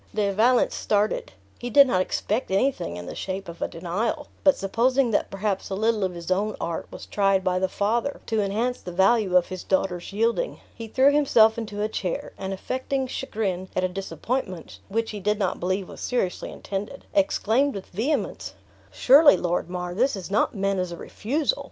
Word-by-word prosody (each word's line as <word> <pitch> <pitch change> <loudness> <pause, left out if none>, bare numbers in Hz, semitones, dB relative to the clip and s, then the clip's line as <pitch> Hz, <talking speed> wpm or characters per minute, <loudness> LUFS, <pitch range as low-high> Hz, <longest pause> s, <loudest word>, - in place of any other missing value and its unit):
De 205 -2 +1
Valence 240 +5 +3
started. 210 0 0 0.3
He 245 - -4
did 280 +4 +8
not 185 -8 +1
expect 215 +5 -1
anything 190 - 0
in 90 - -7
the - - -6
shape 195 +1 -5
of 170 0 -9
a - - +1
denial; 185 - -3
but 285 - +5
supposing 240 +5 +2
that 205 - +1
perhaps 195 0 -2
a 195 - -2
little 220 0 +1
of 185 -2 -1
his 170 +1 -6
own 205 +3 +1
art 170 -1 -3
was - - -9
tried 195 -2 +2
by 185 0 +1
the 190 0 0
father 230 +9 -1
to 220 -2 0
enhance 225 +5 -1
the 180 - -7
value 190 +1 +3
of 175 - +1
his 185 -1 -6
daughter's 185 -2 -1
yielding, 230 - 0
he 230 -1 -8
threw 265 +5 +4
himself 230 -7 +5
into 210 -2 -4
a - - +1
chair, 190 -5 -4
and 190 - -4
affecting 260 +7 -2
chagrin 200 -8 -3
at 185 - +1
a - - +3
disappointment 185 - -4
(which 225 +2 -1
he 210 - -6
did 210 +2 0
not 195 -3 -1
believe 185 +1 -1
was - - -10
seriously 215 -8 -2
intended), 205 +7 -6
exclaimed 285 -3 +2
with 195 - -6
vehemence, 240 - -2 0.4
"Surely, 285 +3 +7
Lord 175 -1 -1
Mar, 180 -1 -4
this 255 +7 +1
is 195 0 -7
not 215 +2 +1
meant 195 -1 0
as 180 -1 -2
a 170 - -6
refusal? 300 - -1
205 Hz, 195 wpm, -25 LUFS, 185-240 Hz, 0.4 s, did